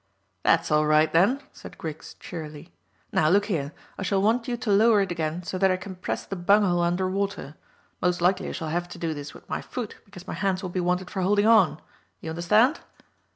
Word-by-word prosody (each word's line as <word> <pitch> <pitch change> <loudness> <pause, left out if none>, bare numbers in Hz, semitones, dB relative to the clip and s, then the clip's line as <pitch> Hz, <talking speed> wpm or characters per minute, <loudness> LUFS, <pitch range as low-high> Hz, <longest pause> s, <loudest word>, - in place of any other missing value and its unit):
"That's - - +2
all 150 0 +3
right, 155 +1 +4
then," 205 +12 +3
said - - -12
Griggs 160 -1 -7
cheerily. 155 -1 -9 0.4
"Now, 155 - +3
look 200 +4 +4
here, 155 -9 -2 0.3
I - - -4
shall 195 +1 +1
want 225 +4 +1
you 245 -1 -2
to 235 -3 -2
lower 210 +1 +5
it 195 -2 -2
again 165 +1 -3
so 185 +1 -4
that 190 0 +4
I 185 - +1
can 190 +1 -8
press 180 - -4
the 195 - -5
bung 200 +4 +4
hole 175 -3 +2
under 175 +2 +1
water. 195 -6 -3 0.5
Most 180 -1 +1
likely 180 +2 +1
I - - -5
shall 160 - -4
have 175 +2 -2
to - - -9
do 165 -2 -2
this 145 0 -8
with - - -15
my - - -3
foot, 240 -5 -6
because 190 -3 -13
my - - -4
hands 190 -1 -1
will 185 - -4
be 185 - -2
wanted 180 +1 -1
for 190 - -2
holding 205 +3 +2
on. 220 -8 +5 0.4
You 160 - -6
understand?" 215 - +3
185 Hz, 225 wpm, -25 LUFS, 165-200 Hz, 0.5 s, lower